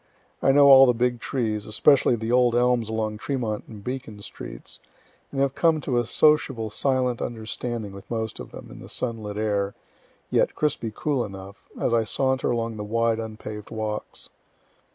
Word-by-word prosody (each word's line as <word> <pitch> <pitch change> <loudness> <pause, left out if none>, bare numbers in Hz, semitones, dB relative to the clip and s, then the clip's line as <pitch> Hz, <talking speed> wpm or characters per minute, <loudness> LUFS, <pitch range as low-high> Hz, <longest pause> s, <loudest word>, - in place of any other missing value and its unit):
I - - +5
know 140 +1 +6
all 135 -1 +9
the 125 - +3
big 120 0 +1
trees, 110 -6 -2
especially 125 +4 +4
the 115 0 -3
old 125 -1 +4
elms 120 -2 +2
along 110 -1 -2
Tremont 115 -6 -2
and 105 -3 -11
Beacon 125 -4 -5
streets, - - -8 0.5
and 135 - -3
have 135 -1 +2
come 165 0 +3
to 125 -3 0
a 120 - -2
sociable 135 -8 +2
silent 125 +1 0
understanding 115 -1 -4
with 100 0 -12
most 110 -2 -3
of - - -8
them, - - -11
in - - -11
the - - -11
sunlit 110 -4 -4
air, 100 -2 0 0.6
(yet - - +2
crispy 140 -7 -1
cool 140 -5 0
enough,) 100 -1 -10
as 120 - +1
I 115 -1 +3
saunter 130 +4 0
along 115 -2 -1
the 105 - -4
wide 115 +1 +1
unpaved 110 -1 -7
walks. 110 -1 -4
115 Hz, 175 wpm, -25 LUFS, 110-125 Hz, 0.6 s, all